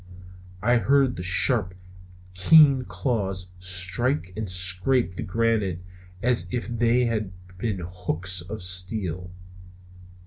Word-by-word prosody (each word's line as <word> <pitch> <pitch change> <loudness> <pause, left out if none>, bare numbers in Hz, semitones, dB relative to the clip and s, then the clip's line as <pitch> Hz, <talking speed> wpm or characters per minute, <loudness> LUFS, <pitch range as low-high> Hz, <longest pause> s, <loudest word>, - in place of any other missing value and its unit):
I 120 +2 +3
heard 135 +1 +2
the - - -6
sharp, 90 0 +1 0.6
keen 135 - +5
claws 95 -2 -3
strike 90 - +1
and 110 -2 -5
scrape 95 +6 +2
on - - -16
the - - -4
granite 105 -4 -1 0.4
as 125 -1 +1
if 125 -1 -4
they 120 +1 +1
had 110 -4 -2 0.3
been 100 -4 -3
hooks 90 0 -1
of 95 +2 -7
steel. 90 -1 -2
95 Hz, 115 wpm, -24 LUFS, 90-120 Hz, 0.6 s, keen